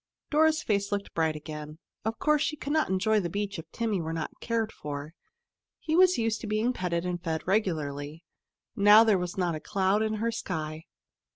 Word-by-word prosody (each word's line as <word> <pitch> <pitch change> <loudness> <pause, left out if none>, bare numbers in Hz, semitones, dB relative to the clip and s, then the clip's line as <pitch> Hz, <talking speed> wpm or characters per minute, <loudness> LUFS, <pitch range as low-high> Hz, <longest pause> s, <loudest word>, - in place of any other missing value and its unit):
Dora's 315 +1 +3
face 200 -1 0
looked 200 0 -3
bright 160 -1 +1
again. 150 0 -7 0.3
Of 225 +1 -2
course 300 -4 +2
she 305 0 0
could 290 0 -4
not 315 -1 +2
enjoy 210 +3 +2
the 175 -4 -2
beach 200 0 -3
if 160 - -10
Timmy 220 -6 -1
were 160 0 -3
not 160 -2 -5
cared 225 -2 -1
for. 145 +1 -6 0.6
He 315 - -2
was 365 +1 +6
used 225 -1 0
to 225 - -5
being 215 +4 +1
petted 175 -4 -2
and 175 -1 -3
fed 160 -1 -2
regularly. 155 -6 -1 0.5
Now 210 +1 +8
there 215 -4 +3
was 180 +1 -4
not 175 -2 +1
a 155 - -4
cloud 195 +3 +1
in 220 0 0
her 230 +2 -1
sky. 160 -7 -4
200 Hz, 195 wpm, -28 LUFS, 160-225 Hz, 0.6 s, Now